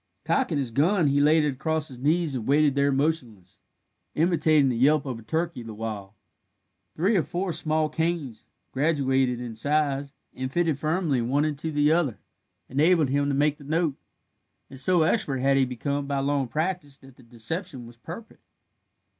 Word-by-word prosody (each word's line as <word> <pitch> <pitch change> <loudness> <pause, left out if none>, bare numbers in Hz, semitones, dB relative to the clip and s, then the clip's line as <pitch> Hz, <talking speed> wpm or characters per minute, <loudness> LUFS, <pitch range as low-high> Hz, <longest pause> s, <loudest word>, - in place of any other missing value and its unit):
Cocking 250 - +1
his 135 -4 -2
gun, 160 - +2
he 140 +1 +2
laid 155 +2 +4
it 150 -2 0
across 155 +3 -2
his 125 -2 -11
knees, 155 +2 +1
and 120 -4 -4
waited 145 +1 +4
there 140 0 +2
motionless, 135 - -2 0.5
imitating 155 -4 +3
the 125 - -1
yelp 145 +5 +3
of 125 -4 -4
a - - -11
turkey 160 +5 -2
the 115 -2 -8
while. 105 -2 -6 0.8
Three 190 +8 +2
or 185 - +4
four 175 +4 -3
small 155 0 0
canes, 160 -7 -3 0.2
graduated 135 -4 +1
in 120 -2 -6
size, 140 +2 -1 0.2
and 130 0 -5
fitted 165 -3 0
firmly 155 -4 0
one 135 +6 +1
into 155 +1 -3
the 145 0 +3
other, 155 -10 +1 0.5
enabled 155 +2 +3
him 140 +1 +1
to 140 - 0
make 145 +1 +2
the - - -14
note, 160 +1 0 0.8
and 135 - -9
so 175 +4 +3
expert 155 - +1
had 135 +2 +2
he 135 -1 +3
become 140 +3 -3
by 140 -1 -1
long 140 -1 0
practice 155 -1 -3
that 135 -1 -17
the - - -18
deception 125 - -5
was 120 0 -14
perfect. 175 - -10
145 Hz, 175 wpm, -26 LUFS, 130-160 Hz, 0.8 s, laid